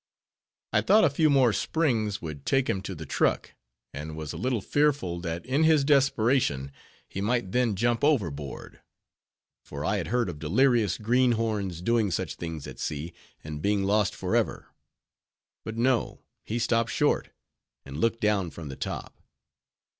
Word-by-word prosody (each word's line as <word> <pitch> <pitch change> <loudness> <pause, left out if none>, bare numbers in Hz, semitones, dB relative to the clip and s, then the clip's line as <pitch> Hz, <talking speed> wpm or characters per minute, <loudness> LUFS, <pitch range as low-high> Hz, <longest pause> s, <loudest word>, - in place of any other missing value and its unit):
I - - +4
thought 215 +1 +5
a 155 - +4
few 155 +2 +3
more 130 -5 +4
springs 115 - 0
would 75 -4 -6
take 135 - +1
him 95 - -1
to 95 -1 -6
the 80 0 -8
truck, - - 0 0.4
and 75 +2 -6
was 80 -2 -5
a - - -6
little 125 -1 0
fearful 145 -9 0
that 85 +2 -4
in 135 +5 +1
his 160 -3 +5
desperation 130 - +2 0.4
he 95 - -5
might 105 -2 0
then 125 -3 +1
jump 120 +4 0
overboard; 85 - -1 0.8
for - - -6
I - - +1
had - - -3
heard 120 0 +1
of 80 -4 -6
delirious 110 - +2
greenhorns 110 -6 0
doing 115 -1 +2
such 85 - -2
things 80 -4 -6
at - - -9
sea, 75 +3 -4 0.3
and 75 -1 -6
being 100 +1 +1
lost 105 +1 +1
forever. - - -1 0.9
But 110 0 -6
no; 120 0 +1 0.2
he 115 - -2
stopped 115 -1 +1
short, 145 +5 +1 0.6
and 70 - -9
looked 115 +8 0
down 105 -5 +1
from 80 -1 -9
the 70 - -6
top. - - -6
110 Hz, 160 wpm, -27 LUFS, 85-125 Hz, 0.9 s, thought